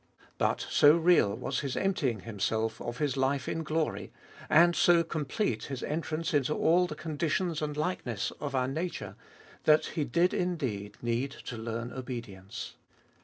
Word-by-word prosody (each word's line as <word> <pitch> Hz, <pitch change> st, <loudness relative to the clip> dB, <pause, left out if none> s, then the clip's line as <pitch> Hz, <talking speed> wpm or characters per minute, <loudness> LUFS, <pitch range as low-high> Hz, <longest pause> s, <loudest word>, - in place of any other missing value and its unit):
But -, -, +1 dB
so 150 Hz, +3 st, +6 dB
real 170 Hz, -, +4 dB
was 125 Hz, -, -2 dB
His 140 Hz, -3 st, -3 dB
emptying 140 Hz, -, 0 dB
Himself 110 Hz, +1 st, -2 dB
of 120 Hz, +1 st, -4 dB
His 145 Hz, -2 st, 0 dB
life 135 Hz, +1 st, +1 dB
in 165 Hz, -, -2 dB
glory, 160 Hz, 0 st, -2 dB, 0.4 s
and 170 Hz, +2 st, +6 dB
so 170 Hz, -1 st, +5 dB
complete 160 Hz, -, -2 dB
His 135 Hz, -3 st, -5 dB
entrance 160 Hz, +2 st, -2 dB
into 145 Hz, +1 st, +2 dB
all 175 Hz, +2 st, +3 dB
the 155 Hz, -, -6 dB
con 155 Hz, -2 st, -6 dB
ditions 165 Hz, 0 st, 0 dB
and 150 Hz, -1 st, -3 dB
likeness 150 Hz, -, -2 dB
of 140 Hz, -2 st, -3 dB
our 130 Hz, -1 st, +1 dB
nature, 165 Hz, +6 st, -4 dB, 0.5 s
that 155 Hz, 0 st, +5 dB
He 155 Hz, -, 0 dB
did 175 Hz, +4 st, +2 dB
indeed 125 Hz, -, -2 dB
need 120 Hz, +3 st, 0 dB, 0.2 s
to 120 Hz, -, -5 dB
learn 115 Hz, +1 st, -4 dB
obedience. 120 Hz, -7 st, -7 dB
145 Hz, 160 wpm, -30 LUFS, 120-165 Hz, 0.5 s, so